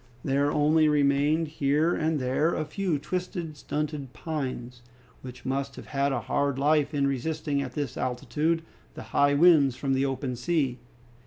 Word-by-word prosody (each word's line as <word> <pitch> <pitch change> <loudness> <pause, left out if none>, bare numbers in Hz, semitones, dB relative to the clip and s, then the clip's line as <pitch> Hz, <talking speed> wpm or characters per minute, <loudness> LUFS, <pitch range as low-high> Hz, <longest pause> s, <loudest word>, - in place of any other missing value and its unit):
There 140 +1 +1
only 155 +1 +3
remained 145 +2 +2
here 150 +3 +1
and 155 -1 0
there 130 +6 +1
a 155 - -2
few 170 +1 -1
twisted, 175 0 -4
stunted 145 -2 -4
pines, 130 -6 -5 0.4
which 125 -1 -10
must 135 +1 -2
have - - -10
had 140 0 0
a - - -1
hard 140 -2 0
life 145 +1 +2
in 145 -2 +1
resisting 140 +2 -1
at 130 -2 -5
this 145 -1 -3
altitude 150 +7 -1 0.3
the - - -7
high 145 0 +4
winds 145 -5 +5
from 135 +1 -1
the 135 +1 +1
open 135 -1 -3
sea. 135 -2 -1
145 Hz, 160 wpm, -27 LUFS, 135-155 Hz, 0.4 s, winds